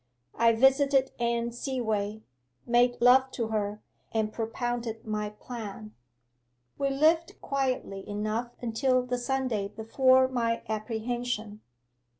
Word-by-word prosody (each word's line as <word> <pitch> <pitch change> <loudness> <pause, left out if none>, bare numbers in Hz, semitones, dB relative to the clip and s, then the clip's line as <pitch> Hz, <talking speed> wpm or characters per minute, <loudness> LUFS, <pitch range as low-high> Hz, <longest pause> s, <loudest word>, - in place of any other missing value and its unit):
I 230 0 +4
visited 270 +2 +4
Anne 235 0 0
Seaway, 220 -4 -2 0.4
made 245 +1 +3
love 260 +2 +6
to 230 -3 -2
her, 210 -1 -2 0.3
and 215 -1 -1
propounded 230 0 -3
my 210 -1 -2
plan. 215 -1 -8 0.9
'We 275 - +1
lived 315 +4 +2
quietly 255 -8 -2
enough 215 +3 -2
until 255 +2 +1
the 250 0 -2
Sunday 250 -5 -1
before 255 +5 +3
my 230 -3 -1
apprehension. 220 0 -3
235 Hz, 110 wpm, -28 LUFS, 215-255 Hz, 0.9 s, love